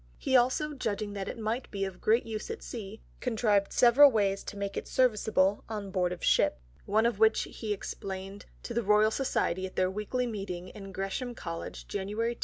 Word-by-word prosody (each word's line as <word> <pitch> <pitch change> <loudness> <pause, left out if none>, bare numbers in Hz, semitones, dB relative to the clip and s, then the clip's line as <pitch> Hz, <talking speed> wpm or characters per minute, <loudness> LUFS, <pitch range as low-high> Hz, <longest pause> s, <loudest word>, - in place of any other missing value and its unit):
He 265 - 0
also 260 +5 +3
judging 215 -6 -3
that 195 -1 -4
it - - -5
might 225 +3 -2
be 195 -1 -2
of 190 -2 -8
great 225 +3 +3
use 220 - -5
at 455 - -6
Sea, 220 -3 -7 0.2
contrived 215 -5 +1
several 255 +4 +7
ways 200 -5 +1
to 205 - -7
make 200 0 -3
it - - -4
serviceable 210 -5 +2
on 205 -3 -5
Board 180 -2 +1
of 180 - -6
Ship; - - +3 0.3
one 215 +3 +3
of 235 -3 +1
which 220 0 +4
he 220 -2 -6
explain'd 195 0 -5 0.2
to 235 - -5
the 235 - +1
Royal 210 +1 +4
Society 190 -8 0
at 185 - -14
their 185 0 +2
Weekly 210 +5 -2
Meeting 195 -6 -5
in 195 -2 -10
Gresham 195 +6 -3
College, 165 -5 -6
_January 210 +4 -2
2. - - -19
210 Hz, 200 wpm, -30 LUFS, 195-235 Hz, 0.3 s, several